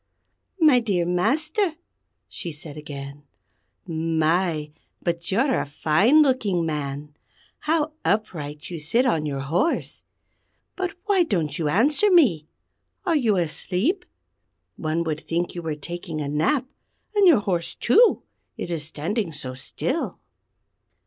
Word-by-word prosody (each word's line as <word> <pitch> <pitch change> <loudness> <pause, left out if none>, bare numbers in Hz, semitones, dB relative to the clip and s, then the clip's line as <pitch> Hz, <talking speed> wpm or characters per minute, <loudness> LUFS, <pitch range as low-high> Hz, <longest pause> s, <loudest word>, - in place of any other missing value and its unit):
"My 300 -6 +6
dear 195 -7 0
Master," 305 - +1 0.5
she 170 - -6
said 150 -1 -8
again, 140 -1 -8 0.6
"My! 160 -1 0 0.3
but 170 0 -2
you're 260 +8 +2
a - - 0
fine 195 - +4
looking 210 - +1
man! 145 -1 -4 0.4
How 310 0 0
upright 160 -7 -2
you 170 - -4
sit 230 - +2
on 160 -11 +1
your 140 -2 -3
horse! 170 - -1 0.7
But 370 0 -3
why 400 -3 +3
don't 165 - -1
you 160 - 0
answer 285 - +3
me? 235 - +4 0.6
Are 340 -3 +2
you 235 -8 +3
asleep? 185 - -1 0.7
One 160 +1 -1
would 155 -2 -3
think 170 +1 -2
you 175 - -5
were 160 -2 -3
taking 165 +1 -6
a 145 - -2
nap; 160 - +1 0.5
and 405 -2 +5
your 290 -12 +6
horse, 175 -4 -2
too, 450 - +4 0.3
it 175 - -5
is 165 -3 -2
standing 165 +6 -3
so 135 -4 -6
still!" 130 - -3
175 Hz, 130 wpm, -24 LUFS, 155-260 Hz, 0.7 s, My